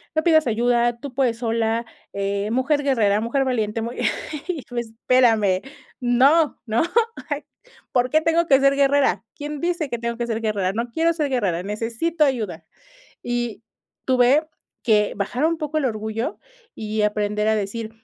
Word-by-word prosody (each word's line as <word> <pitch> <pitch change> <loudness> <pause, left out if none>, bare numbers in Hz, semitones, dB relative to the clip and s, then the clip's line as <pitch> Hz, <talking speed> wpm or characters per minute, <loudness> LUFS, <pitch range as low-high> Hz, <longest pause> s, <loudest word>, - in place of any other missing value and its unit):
no 315 - +2
pidas 315 -5 +4
ayuda, 240 +1 +2
tú 255 +1 -8
puedes 240 -4 0
sola, 230 0 0 0.3
eh, 200 +1 -2
mujer 280 +4 +1
guerrera, 215 -7 +2
mujer 240 +5 0
valiente, 225 -4 -1
muy, 235 +2 -5 0.5
y 335 -6 -3
tú, 245 - -9
espérame, 225 -4 +2 0.4
¡no! 270 +6 +3
¿no?, 225 +6 +1 0.5
ah, - - -2 0.5
¿por 250 0 +2
qué 310 +3 +3
tengo 330 +1 +2
que 270 -1 +6
ser 275 0 +4
guerrera?, 275 -8 +2
¿quién 295 0 -6
dice 340 -4 -1
que 240 - -3
tengo 235 0 -3
que 240 - -2
ser 225 -1 -2
guerrera?, 200 -4 0
no 235 +3 -3
quiero 325 +7 +1
ser 310 -3 -1
guerrera, 190 -9 0
necesito 230 - -1
ayuda, 210 - -1 0.6
y 240 -3 -3 0.4
tuve 260 +4 +3 0.4
que 210 -2 +2
bajar 245 +9 0
un 335 0 0
poco 310 -1 -2
el 275 - 0
orgullo 220 0 -3 0.4
y 215 0 -2
aprender 210 0 0
a 220 - +3
decir: 215 +2 -3
240 Hz, 165 wpm, -22 LUFS, 215-275 Hz, 0.6 s, que